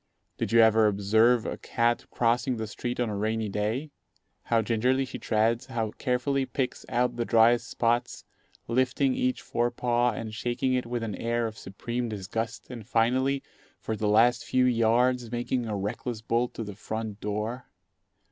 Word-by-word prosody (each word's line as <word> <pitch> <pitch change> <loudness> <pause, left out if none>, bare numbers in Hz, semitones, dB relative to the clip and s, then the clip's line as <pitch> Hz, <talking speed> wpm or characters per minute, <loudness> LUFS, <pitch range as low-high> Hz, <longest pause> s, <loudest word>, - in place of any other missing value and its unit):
Did - - -2
you 115 0 +6
ever 110 -1 +5
observe 110 +4 +3
a - - -3
cat 120 0 0
crossing 120 +2 +1
the 110 - -3
street 120 +3 -5
on 120 - +1
a - - -3
rainy 110 +1 -1
day? 110 +9 -2 0.5
How 115 -1 +2
gingerly 125 +4 +1
she - - -7
treads, 115 +4 +1
how 115 -4 -2
carefully 135 +3 0
picks 130 0 -3
out 125 +1 0
the 120 - 0
driest 115 +1 +4
spots, 120 +1 0 0.4
lifting 130 +2 +1
each 130 0 -1
fore 120 +1 0
paw 120 0 +1
and 110 -1 -5
shaking 120 +3 -1
it 125 -2 0
with 120 -1 -3
an 110 -2 -3
air 115 +3 -1
of 110 -1 -4
supreme 120 +5 -4
disgust, 110 +4 -4
and 120 -3 -7
finally, 130 +3 +1 0.4
for 110 - -3
the 105 0 -1
last 115 +3 +4
few 130 0 +2
yards, 120 0 +2
making 120 0 -1
a 105 -2 -2
reckless 110 +3 -4
bolt 120 +1 0
to 115 - -4
the 105 -1 -7
front 110 +1 -5
door. 105 +4 -3
115 Hz, 170 wpm, -27 LUFS, 110-125 Hz, 0.5 s, you